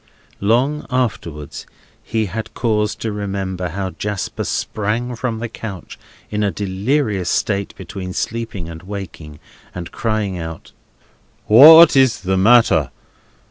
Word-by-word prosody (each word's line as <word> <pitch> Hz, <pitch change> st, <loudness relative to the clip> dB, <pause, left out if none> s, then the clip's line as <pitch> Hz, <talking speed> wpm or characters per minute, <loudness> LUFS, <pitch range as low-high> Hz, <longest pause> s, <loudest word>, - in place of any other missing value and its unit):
Long 125 Hz, +9 st, +1 dB
afterwards 95 Hz, -, -3 dB, 0.3 s
he 110 Hz, -1 st, -2 dB
had 110 Hz, +3 st, -6 dB
cause 105 Hz, -2 st, 0 dB
to 110 Hz, 0 st, -4 dB
remember 95 Hz, -3 st, -4 dB
how 95 Hz, +2 st, -4 dB
Jasper 105 Hz, -1 st, -4 dB
sprang 115 Hz, +4 st, -2 dB
from 115 Hz, -1 st, -3 dB
the 115 Hz, +1 st, -4 dB
couch 100 Hz, -6 st, -8 dB, 0.3 s
in 105 Hz, 0 st, -1 dB
a 105 Hz, -, +2 dB
delirious 100 Hz, 0 st, -1 dB
state 100 Hz, -1 st, -1 dB
between 95 Hz, -4 st, -7 dB
sleeping 115 Hz, -6 st, -4 dB
and 80 Hz, -1 st, -9 dB
waking, 90 Hz, -6 st, -8 dB, 0.4 s
and 85 Hz, -2 st, -7 dB
crying 110 Hz, -5 st, -2 dB
out: 80 Hz, -1 st, -8 dB, 0.7 s
"What 155 Hz, +9 st, +9 dB
is 130 Hz, -7 st, +3 dB
the 95 Hz, 0 st, 0 dB
matter? 95 Hz, -, +4 dB
105 Hz, 125 wpm, -19 LUFS, 95-115 Hz, 0.7 s, What